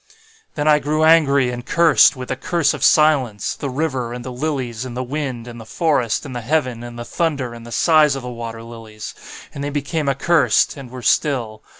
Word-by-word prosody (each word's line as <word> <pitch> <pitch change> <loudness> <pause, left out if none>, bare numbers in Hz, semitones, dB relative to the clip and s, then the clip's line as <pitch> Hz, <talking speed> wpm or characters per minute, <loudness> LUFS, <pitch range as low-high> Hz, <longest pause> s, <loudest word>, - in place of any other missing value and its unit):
"Then 150 0 -1
I 150 -1 +5
grew 155 +2 0
angry 140 -5 +4
and 120 0 -6
cursed, 160 +1 +4
with 130 -1 -8
the 130 - -1
curse 165 +2 0
of - - -5
silence, 140 -9 +3
the 140 - -5
river, 130 -4 -2
and 120 0 -7
the 130 - -5
lilies, 125 -4 -3
and 125 -1 -7
the 130 - -2
wind, 130 -3 -4
and 120 -1 -9
the - - -9
forest, 145 -9 0
and 130 -3 -7
the 120 - -4
heaven, 130 -2 -1
and 120 0 -9
the 120 - -6
thunder, 140 -7 -2
and 115 0 -11
the - - -10
sighs 150 +3 +4
of 135 - -6
the - - -6
water 115 -1 -7
lilies. 115 -2 -9 0.4
And 140 - -6
they 145 - -2
became 145 +1 -2
accursed, 155 +5 +2
and 135 -4 -10
were 125 0 -9
still. 120 -9 0
130 Hz, 215 wpm, -20 LUFS, 120-150 Hz, 0.4 s, I